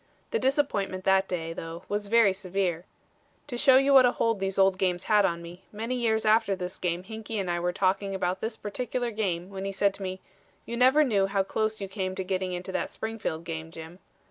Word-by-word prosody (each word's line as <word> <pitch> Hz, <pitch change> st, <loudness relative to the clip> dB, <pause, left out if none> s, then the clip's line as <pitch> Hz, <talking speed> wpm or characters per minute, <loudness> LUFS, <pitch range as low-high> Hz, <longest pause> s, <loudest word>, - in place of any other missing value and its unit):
The 460 Hz, -, +1 dB
disappointment 205 Hz, -9 st, 0 dB
that 190 Hz, 0 st, +3 dB
day, 165 Hz, -2 st, -3 dB
though, 165 Hz, +1 st, -7 dB
was 205 Hz, 0 st, -2 dB
very 225 Hz, -2 st, +5 dB
severe. 185 Hz, -3 st, -2 dB, 0.6 s
To 280 Hz, -4 st, -6 dB
show 260 Hz, +2 st, +6 dB
you 275 Hz, +1 st, +4 dB
what 265 Hz, -1 st, +9 dB
a 245 Hz, -, +1 dB
hold 230 Hz, -3 st, 0 dB
these 195 Hz, 0 st, -2 dB
old 190 Hz, -1 st, +4 dB
games 180 Hz, -1 st, 0 dB
had 210 Hz, -2 st, +4 dB
on 170 Hz, 0 st, -1 dB
me, 175 Hz, +2 st, -11 dB
many 225 Hz, +4 st, -3 dB
years 225 Hz, -3 st, +1 dB
after 215 Hz, -2 st, +3 dB
this 180 Hz, -1 st, -6 dB
game 175 Hz, 0 st, -1 dB
Hinkey 220 Hz, +1 st, -6 dB
and 185 Hz, -3 st, -1 dB
I 175 Hz, -, -1 dB
were 175 Hz, +1 st, 0 dB
talking 195 Hz, +2 st, 0 dB
about 185 Hz, 0 st, -1 dB
this 225 Hz, -, -3 dB
particular 245 Hz, +3 st, -3 dB
game, 190 Hz, -4 st, -2 dB
when 190 Hz, -1 st, -6 dB
he 195 Hz, -, -2 dB
said 200 Hz, 0 st, +1 dB
to -, -, -12 dB
me: 185 Hz, 0 st, -4 dB, 0.5 s
'You 235 Hz, -, -4 dB
never 260 Hz, +5 st, +5 dB
knew 205 Hz, -8 st, +2 dB
how 195 Hz, 0 st, +1 dB
close 215 Hz, +2 st, -1 dB
you 195 Hz, -, -4 dB
came 190 Hz, -1 st, -3 dB
to 190 Hz, -, -3 dB
getting 185 Hz, 0 st, -2 dB
into 180 Hz, +1 st, -5 dB
that -, -, -2 dB
Springfield 220 Hz, -8 st, -4 dB
game, 160 Hz, -1 st, -5 dB
Jim.' 165 Hz, +2 st, -10 dB
195 Hz, 220 wpm, -27 LUFS, 180-220 Hz, 0.6 s, what